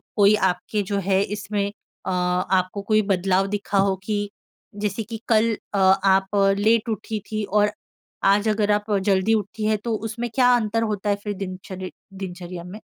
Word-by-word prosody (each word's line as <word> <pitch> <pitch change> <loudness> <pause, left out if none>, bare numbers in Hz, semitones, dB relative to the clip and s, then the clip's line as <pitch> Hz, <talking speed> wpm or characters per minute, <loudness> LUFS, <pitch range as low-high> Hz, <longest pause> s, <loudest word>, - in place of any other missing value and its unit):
कोई 205 0 +6
आपके 180 +4 -2
जो 200 - 0
है 190 0 +3
इसमें 205 -1 -2 0.4
अ, - - -1
आपको 180 +2 0
कोई 215 0 +5
बदलाव 190 +1 +2
दिखा 205 0 -2
हो? 195 0 +3
कि 205 -1 -1 0.5
जैसे 210 +1 -1
कि 225 +1 -8
कल 225 0 +3 0.2
अ, - - 0
आप 190 +1 +3 0.2
लेट 225 +2 +3
उठी 220 0 -3
थीं 215 -1 -1
और 210 +1 +2 0.6
आज 205 +2 +1
अगर 210 -1 +1
आप 210 +1 0 0.2
जल्दी 195 +2 +3
उठी 215 0 -2
हैं 215 0 +2
तो 230 -2 -1
उसमें 235 +2 -4
क्या 250 -2 +5
अंतर 225 -1 0
होता 205 0 -2
है 205 - +3
फिर 210 - -2
दिनचर 185 -1 -6 0.3
दिनचर्या 180 -1 -7
में? 180 +4 -9
205 Hz, 170 wpm, -23 LUFS, 190-215 Hz, 0.6 s, कोई